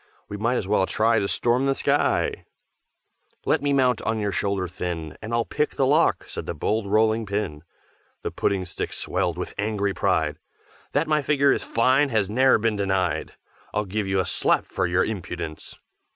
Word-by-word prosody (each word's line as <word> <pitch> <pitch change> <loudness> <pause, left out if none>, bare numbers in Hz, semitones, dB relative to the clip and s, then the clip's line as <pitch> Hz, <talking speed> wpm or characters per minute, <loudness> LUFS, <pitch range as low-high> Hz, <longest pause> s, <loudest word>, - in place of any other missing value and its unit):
We 105 - -6
might 115 +4 0
as 95 - -2
well 95 -2 +2
try 115 +1 +2
to 100 - -1
storm 120 +6 +1
the 135 - +2
sky!" - - +1 1.0
"Let - - +2
me 145 0 0
mount 130 -4 +3
on 110 0 -1
your 105 -2 -1
shoulder 100 -2 -1
thin, 85 -2 -5
And 110 - -6
I'll 115 0 +1
pick 150 - -1
the 135 - +2
lock!" 150 +5 +3
said - - -6
the - - -3
bold 105 +7 -1
Rolling 110 +1 +2
pin. 100 -7 -3 0.6
The - - -2
Pudding 95 -2 0
stick 90 - -5
swelled 90 -1 -1
with 90 - -5
angry 105 -1 0
pride, 80 -4 0 0.5
"That 150 +3 +1
my 155 -1 +2
figure 140 0 +3
is - - +1
fine 130 +5 +2
has 105 -4 0
ne'er 130 +4 +5
been 110 -1 0
denied, 95 -5 -1 0.4
I'll 105 0 +1
give 100 +1 -2
you 95 0 +1
a 95 - +1
slap - - +1
for - - -1
your 90 +1 +2
impudence!" 85 -6 -6
105 Hz, 185 wpm, -24 LUFS, 95-120 Hz, 1.0 s, ne'er